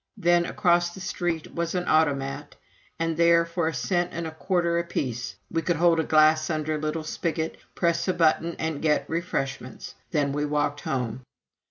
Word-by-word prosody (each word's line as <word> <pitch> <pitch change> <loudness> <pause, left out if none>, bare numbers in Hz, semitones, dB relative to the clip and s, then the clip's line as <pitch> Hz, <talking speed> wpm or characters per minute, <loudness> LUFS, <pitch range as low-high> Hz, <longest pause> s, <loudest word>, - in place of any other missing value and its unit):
Then 175 0 +3
across 175 -3 +2
the - - -9
street 175 -3 -3
was 170 +1 -2
an 180 0 -1
"Automat," 140 -2 +1 0.4
and 165 0 -1
there, 170 0 +5
for 170 -1 -1
a 165 - -1
cent 175 +6 0
and 170 0 -3
a 160 - -4
quarter 170 +1 0
apiece, 130 -8 -3 0.2
we 165 - 0
could 170 +2 0
hold 165 0 +4
a - - +2
glass 155 0 +4
under 155 -1 -1
a 155 - -2
little 155 +1 -2
spigot, 160 0 -3 0.2
press 170 0 +1
a 185 - +2
button, 165 0 +2
and 160 -2 -3
get 155 -1 +1
refreshments. 135 -6 -4 0.2
Then 145 -4 +1
we 145 +1 -1
walked 145 -1 -1
home. 125 -2 -3
160 Hz, 180 wpm, -26 LUFS, 150-170 Hz, 0.4 s, there